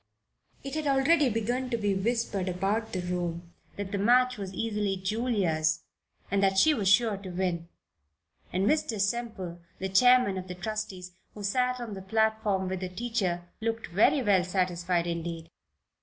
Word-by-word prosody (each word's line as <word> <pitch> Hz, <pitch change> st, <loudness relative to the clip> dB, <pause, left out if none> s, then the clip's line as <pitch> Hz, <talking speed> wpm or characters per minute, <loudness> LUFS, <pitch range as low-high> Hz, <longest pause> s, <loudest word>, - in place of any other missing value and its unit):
It 275 Hz, -, -6 dB
had 310 Hz, -1 st, -2 dB
already 275 Hz, +1 st, +4 dB
begun 240 Hz, +3 st, -1 dB
to 235 Hz, -, 0 dB
be 205 Hz, -2 st, 0 dB
whispered 195 Hz, -2 st, -1 dB
about 195 Hz, +5 st, -1 dB
the 185 Hz, -, -2 dB
room 175 Hz, -1 st, -4 dB, 0.2 s
that 200 Hz, -1 st, -5 dB
the 200 Hz, -, -1 dB
match 250 Hz, +4 st, +4 dB
was 195 Hz, -3 st, -6 dB
easily 210 Hz, -2 st, -1 dB
Julia's 190 Hz, -6 st, 0 dB, 0.5 s
that 195 Hz, -1 st, +2 dB
she 310 Hz, +10 st, +6 dB
was 210 Hz, -8 st, -1 dB
sure 215 Hz, 0 st, +4 dB
to 195 Hz, -1 st, -8 dB
win; 175 Hz, -2 st, -2 dB, 0.8 s
and 185 Hz, +2 st, 0 dB
Mr. 245 Hz, -5 st, +1 dB
Semple, 200 Hz, -5 st, -2 dB, 0.2 s
the 190 Hz, -, -3 dB
chairman 245 Hz, -1 st, +5 dB
of 185 Hz, -, -8 dB
the 180 Hz, -, -6 dB
trustees, 190 Hz, -2 st, -5 dB, 0.2 s
who 210 Hz, -, -8 dB
sat 250 Hz, +5 st, +1 dB
on 235 Hz, -3 st, -5 dB
the 190 Hz, -, -7 dB
platform 220 Hz, -1 st, +1 dB
with 190 Hz, 0 st, -3 dB
the 185 Hz, 0 st, -4 dB
teacher, 185 Hz, -4 st, -2 dB, 0.2 s
looked 225 Hz, 0 st, -2 dB
very 260 Hz, -, +4 dB
well 195 Hz, -4 st, +4 dB
satisfied 180 Hz, -1 st, 0 dB
indeed. 170 Hz, -1 st, -4 dB
200 Hz, 160 wpm, -28 LUFS, 185-230 Hz, 0.8 s, she